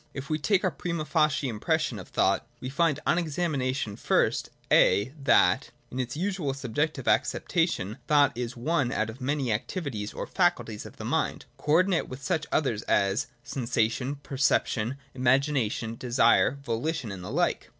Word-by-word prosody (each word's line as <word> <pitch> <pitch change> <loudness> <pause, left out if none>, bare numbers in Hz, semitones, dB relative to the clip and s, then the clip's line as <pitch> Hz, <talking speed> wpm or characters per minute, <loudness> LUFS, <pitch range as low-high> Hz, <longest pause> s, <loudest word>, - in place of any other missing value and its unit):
20.] - - -10
If 140 0 -6
we 155 - +1
take 195 +5 +2
our - - +2
prima 170 -3 -3
facie 155 -3 +2
impression 110 -4 -1
of - - -9
thought, - - +1
we 130 - -5
find 155 +1 +1
on 170 - +3
examination 140 -9 -1
first - - +1 0.2
(a) 110 +7 +4
that, 140 -3 +3 0.2
in 125 - -4
its 130 +3 -3
usual 175 -7 -1
subjective 135 +2 -2
acceptation, 135 - 0
thought 145 -4 +4
is 120 +1 -4
one 135 0 0
out 110 -2 -1
of 125 +4 -14
many 135 -3 0
activities 110 - -3
or - - -5
faculties 175 - 0
of - - -15
the - - -7
mind, - - -1
co 150 - -1
ordinate 185 +1 +3
with 130 +1 -8
such 160 +3 -1
others 120 -8 +1
as 100 +1 +2 0.2
sensation, 120 +2 -1
perception, 135 -3 0 0.2
imagination, 125 -3 +1
desire, 120 +2 +3
voHtion, 120 -1 -2
and 90 -2 -8
the 95 - -6
like. 170 +8 0
135 Hz, 160 wpm, -27 LUFS, 115-155 Hz, 0.2 s, a